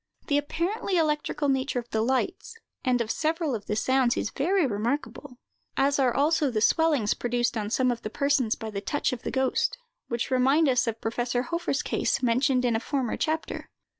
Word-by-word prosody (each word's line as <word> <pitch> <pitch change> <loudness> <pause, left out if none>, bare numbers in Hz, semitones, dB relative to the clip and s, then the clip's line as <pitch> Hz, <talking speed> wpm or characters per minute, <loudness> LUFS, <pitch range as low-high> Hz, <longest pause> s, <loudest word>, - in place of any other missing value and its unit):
The 290 0 +2
apparently 360 +6 -2
electrical 300 -2 0
nature 270 0 0
of 240 -1 -5
the 220 - +1
lights, 260 - -1 0.3
and 250 -2 +2
of 230 -1 -1
several 320 -2 -1
of 215 -3 -5
the 210 - -1
sounds, 260 +2 +2
is 220 - -2
very 355 +4 +1
remarkable, 250 +3 -3 0.4
as 280 +1 +2
are 260 -2 +3
also 290 +2 +2
the 225 -4 -1
swellings 290 -3 +3
produced 240 0 -1
on 210 -2 -2
some 255 +2 +2
of 235 -1 -4
the 215 - -4
persons 275 -3 +1
by 220 -2 -6
the 200 -1 -4
touch 270 +6 -1
of 245 - -5
the - - -4
ghost, 265 - 0 0.3
which 235 +1 -3
remind 270 +5 +4
us 250 -3 +2
of 225 -1 -3
Professor 240 +2 -1
Hofer's 340 -2 -2
case, - - 0
mentioned 250 +1 +2
in 235 -2 +2
a - - +1
former 260 -2 -2
chapter. 315 0 -3
260 Hz, 195 wpm, -27 LUFS, 235-290 Hz, 0.4 s, remind